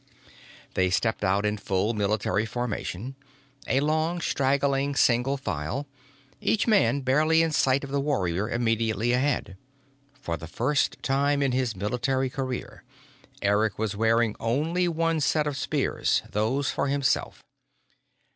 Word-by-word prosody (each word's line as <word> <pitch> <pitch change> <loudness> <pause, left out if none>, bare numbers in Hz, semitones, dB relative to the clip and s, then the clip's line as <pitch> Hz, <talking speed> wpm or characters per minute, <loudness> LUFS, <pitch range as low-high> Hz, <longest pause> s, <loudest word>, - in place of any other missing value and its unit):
They 95 0 +2
stepped 110 +4 0
out 100 +2 +1
in 105 0 0
full 100 +3 -1
military 105 0 0
formation, 120 0 -4 0.5
a 135 - +2
long, 160 +3 0
straggling 140 -1 +1
single 125 +2 +2
file, 95 - -3 0.5
each 215 - +1
man 200 -10 +3
barely 155 +5 +3
in 165 - 0
sight 135 -2 +2
of 140 - -7
the 140 - 0
warrior 105 - -1
immediately 115 -1 0
ahead. 125 -7 0 0.6
For 85 -9 -3
the 80 - -9
first 130 - 0
time 140 +1 +1
in 135 - +1
his 125 -3 -1
military 125 +6 -1
career, 130 -2 -5 0.6
Eric 105 +1 +2
was 110 -2 -2
wearing 115 0 +2
only 155 +10 0
one 165 -1 0
set 150 +1 +1
of 145 -2 -2
spears 145 0 0
those 125 +7 0
for - - -1
himself. 140 -1 0
130 Hz, 135 wpm, -26 LUFS, 110-140 Hz, 0.6 s, man